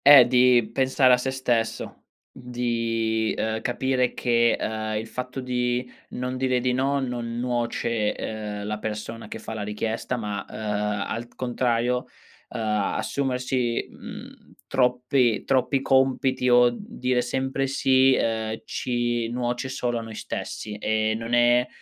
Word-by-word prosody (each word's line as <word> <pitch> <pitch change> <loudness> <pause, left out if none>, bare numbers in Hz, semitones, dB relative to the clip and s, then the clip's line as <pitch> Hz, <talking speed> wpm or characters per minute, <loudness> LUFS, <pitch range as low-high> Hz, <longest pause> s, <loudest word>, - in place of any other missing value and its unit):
Eh, 140 -3 +10
di 125 -2 +4
pensare 130 -1 +4
a - - +6
sé 125 +2 -2
stesso, 120 -4 -2 0.3
di, 115 -2 -1
uhm, 110 0 -1
capire 125 0 0
che, 120 -1 +3
uhm, 110 0 -2
il 110 - -3
fatto 125 +3 -5
di 125 0 -1 0.2
non 125 +1 -4
dire 130 -1 +1
di 125 0 0
no, 135 +2 +1
non 120 -3 -3
nuoce, 120 -3 -1
uhm, 105 -2 -5
la 105 0 -3
persona 110 +1 -5
che - - -6
fa 110 - -7
la 110 - -4
richiesta, 110 +4 -2
ma, 105 -3 -3
uhm, - - -10 0.5
al 115 +2 -4
contrario, 125 0 0 0.4
uhm, 125 - -6 0.4
assumersi, 125 -3 -1
mhmm, - - -11
troppi 125 -2 +2
troppi 135 +1 +1
compiti, 130 -1 +2
o 120 0 +5
dire 125 - -1
sempre 135 +2 -1
sì, 130 -1 +4
uhm, 110 -1 -1
ci 120 -2 -1
nuoce 120 +1 -2
solo 120 -2 -1
a - - -5
noi 115 -1 -8
stessi, 105 0 -5
e 110 0 +1
non 115 +1 -5
è 120 +1 +4
120 Hz, 140 wpm, -25 LUFS, 115-130 Hz, 0.5 s, Eh